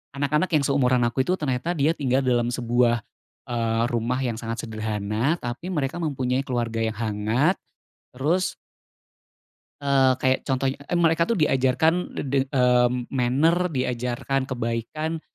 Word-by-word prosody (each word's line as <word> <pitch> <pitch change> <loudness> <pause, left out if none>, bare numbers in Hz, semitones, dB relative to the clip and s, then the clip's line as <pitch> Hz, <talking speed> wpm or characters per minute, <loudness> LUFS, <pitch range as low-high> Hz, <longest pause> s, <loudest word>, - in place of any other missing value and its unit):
anak-anak 150 +5 +1
yang 150 - +3
seumuran 130 -3 +2
aku 120 +2 -1
itu 180 - +2
ternyata 150 +1 -2
dia 145 +2 +3
tinggal 135 -4 0
dalam 120 -2 +2
sebuah, 120 -2 +1 0.4
eee, 115 -1 0
rumah 120 +2 -1
yang 115 -3 -2
sangat 115 0 -4
sederhana, 110 +5 -1
tapi 120 +7 -6
mereka 150 -1 -2
mempunyai 130 -4 0
keluarga 120 -3 -2
yang 110 -1 -1
hangat, 110 - +1 0.6
terus 160 +9 0 1.3
eee, 135 -2 +4
kayak 130 0 +2
contohnya 135 0 0
eh, 175 - 0
mereka 165 0 +3
tuh 230 - +1
diajarkan 145 0 +3 0.2
de - - -2
de 135 0 0
mmm, 125 -2 +2
manner, 145 +8 +2
diajarkan 125 -1 -2
kebaikan, 130 +7 -3
130 Hz, 135 wpm, -24 LUFS, 120-145 Hz, 1.3 s, eee